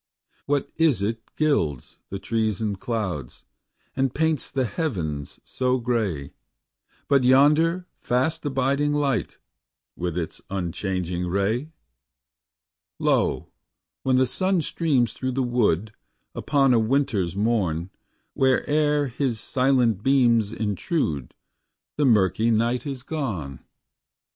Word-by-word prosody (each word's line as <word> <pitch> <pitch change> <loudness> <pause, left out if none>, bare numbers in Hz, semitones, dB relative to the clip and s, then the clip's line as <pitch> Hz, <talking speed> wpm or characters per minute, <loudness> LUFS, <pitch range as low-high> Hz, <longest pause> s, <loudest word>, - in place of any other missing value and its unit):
What 145 -1 0
is 150 - +3
it 115 +2 -1 0.2
gilds 80 - 0
the 100 - -4
trees 110 -1 -1
and 105 -3 -2
clouds, 95 - -4 0.5
And 135 -1 0
paints 160 -2 0
the 135 -2 0
heavens 90 - -3
so 130 0 0
gay, 110 - -2 0.7
But 140 -2 +3
yonder 150 +7 +4
fast 145 +7 0
abiding 140 +1 +1
light 140 -8 0 0.6
With 90 -1 -3
its 85 -2 -4
unchanging 90 -1 -2
ray? 100 - 0 1.3
Lo, - - +1 0.5
when 130 -1 +2
the 130 0 +4
sun 185 +7 +1
streams 135 -9 +1
through 130 +2 -3
the 135 +1 0
wood, 110 -5 +1 0.4
Upon 135 -3 +2
a 115 - +4
winterâs 110 - 0
morn, 95 -6 0 0.4
Whereâer 145 +2 +2
his 125 -2 -1
silent 125 -5 +2
beams 120 -5 +3
intrude, 100 - -2 0.6
The 145 - +2
murky 110 -2 +3
night 115 +3 +1
is 135 -3 -5
gone. 100 - -4
120 Hz, 110 wpm, -24 LUFS, 100-140 Hz, 1.3 s, yonder